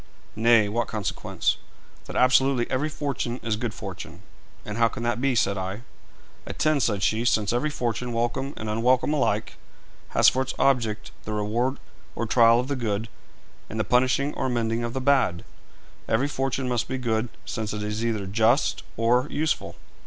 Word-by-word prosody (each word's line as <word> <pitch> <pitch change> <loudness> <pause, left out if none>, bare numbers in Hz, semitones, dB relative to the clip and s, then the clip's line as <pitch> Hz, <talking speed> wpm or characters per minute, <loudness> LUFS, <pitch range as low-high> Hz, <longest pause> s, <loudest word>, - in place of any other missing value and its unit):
'Nay; 115 -1 +5
what 115 +3 -1
consequence?' 105 -4 -1 0.5
'That - - -8
absolutely 130 0 +4
every 140 +4 0
fortune 140 -5 -3
is 115 -2 0
good 115 +1 -3
fortune.' - - -8 0.4
'And 105 +2 -5
how 115 - +5
can 115 +1 -6
that 120 +1 -1
be?' 135 -2 +2
said 100 -3 +1
I. 95 +5 -5 0.6
'Attend,' 155 -2 +1
said 105 -5 0
she. 110 +3 +2
'Since 110 -3 +2
every 125 +6 +1
fortune, 125 -3 -2
welcome 120 +4 -1
and 110 - -5
unwelcome 125 +6 +2
alike, 145 - 0 0.6
has - - +7
for 130 - +4
its 130 - -3
object 115 -6 +1
the 110 - -5
reward 115 +6 0 0.4
or 115 - -2
trial 115 +1 +5
of 125 - -2
the 140 - -1
good, 110 -3 -2 0.6
and 110 - -5
the - - +2
punishing 130 +4 +2
or - - -2
amending 115 -1 -1
of 120 0 -3
the 130 - -2
bad, 130 -11 +2 0.7
every 125 +5 +2
fortune 135 -2 -2
must 120 -2 0
be 130 - -3
good, 115 -2 -1 0.2
since 110 -2 -3
it 105 0 -4
is 105 +2 -3
either 110 -4 -1
just 115 +7 +2 0.2
or 120 +4 +3
useful.' 155 +1 -1
120 Hz, 175 wpm, -25 LUFS, 110-130 Hz, 0.7 s, has